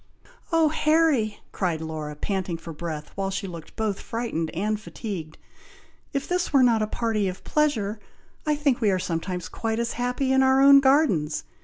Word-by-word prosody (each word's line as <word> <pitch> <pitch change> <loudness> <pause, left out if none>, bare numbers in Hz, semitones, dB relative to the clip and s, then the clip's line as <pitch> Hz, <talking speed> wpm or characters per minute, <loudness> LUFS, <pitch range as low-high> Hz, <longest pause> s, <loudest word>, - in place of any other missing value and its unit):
"Oh, 325 -2 +4
Harry!" 305 -8 +2
cried 175 -5 -1
Laura, 155 -2 -5
panting 185 +1 -2
for 165 0 -9
breath, 155 -1 -6
while 195 0 -2
she 195 +1 -3
looked 170 -4 -9
both 215 -3 -1
frightened 225 -9 -3
and 210 +6 -1
fatigued, 190 -8 -6 0.7
"If 275 -1 -2
this 360 0 -1
were 275 -3 +5
not 230 -3 +4
a 215 - 0
party 220 -2 -1
of 185 0 -5
pleasure, 230 -9 0 0.4
I 300 -1 +1
think 285 -4 +1
we 215 - +3
are 190 - +2
sometimes 180 0 -3
quite 225 -1 -3
as 235 0 -1
happy 250 +2 0
in 265 - +4
our 265 0 +4
own 275 0 +8
gardens! 265 - +2
215 Hz, 175 wpm, -25 LUFS, 180-265 Hz, 0.7 s, own